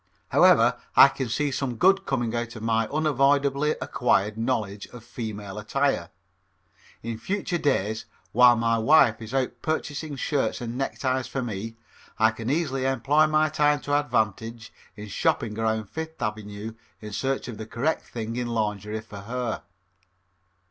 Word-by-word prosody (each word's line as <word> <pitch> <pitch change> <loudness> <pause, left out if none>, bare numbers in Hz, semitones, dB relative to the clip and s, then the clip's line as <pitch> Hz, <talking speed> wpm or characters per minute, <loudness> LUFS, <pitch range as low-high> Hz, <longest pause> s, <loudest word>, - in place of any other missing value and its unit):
However, - - +5 0.2
I - - +9
can 130 - -4
see 145 +5 0
some 130 -2 -2
good 195 +8 +3
coming 120 -4 -1
out 120 0 -3
of 110 - -8
my 115 -1 +1
unavoidably 140 0 +2
acquired 110 -4 +1
knowledge 110 -4 -2
of 120 -2 -12
female 105 -4 -6
attire. 135 +6 0 0.9
In 115 -1 -4
future 185 - -2
days, 110 -7 0 0.3
while 125 +1 +7
my 115 0 +1
wife 120 -2 +5
is 110 0 -8
out 125 -2 -1
purchasing 155 -1 -3
shirts 140 +1 -1
and 120 -1 -5
neckties 130 -1 -1
for 135 - -3
me, 110 0 -5 0.4
I 110 0 +4
can 115 +1 -5
easily 135 -4 0
employ 135 +4 +3
my 155 0 +2
time 150 -1 +2
to 145 - -3
advantage 115 -3 -2 0.2
in 105 0 -8
shopping 105 +1 0
around 110 -1 0
Fifth 160 +8 -7
Avenue 105 -1 -4 0.3
in 105 -1 -8
search 135 +4 -1
of 120 -3 -7
the 110 - -6
correct 140 +8 -1
thing 115 0 -5
in 125 -1 -2
lingerie 105 -2 -2
for 105 -2 -10
her. 120 +3 -3
120 Hz, 155 wpm, -25 LUFS, 110-140 Hz, 0.9 s, I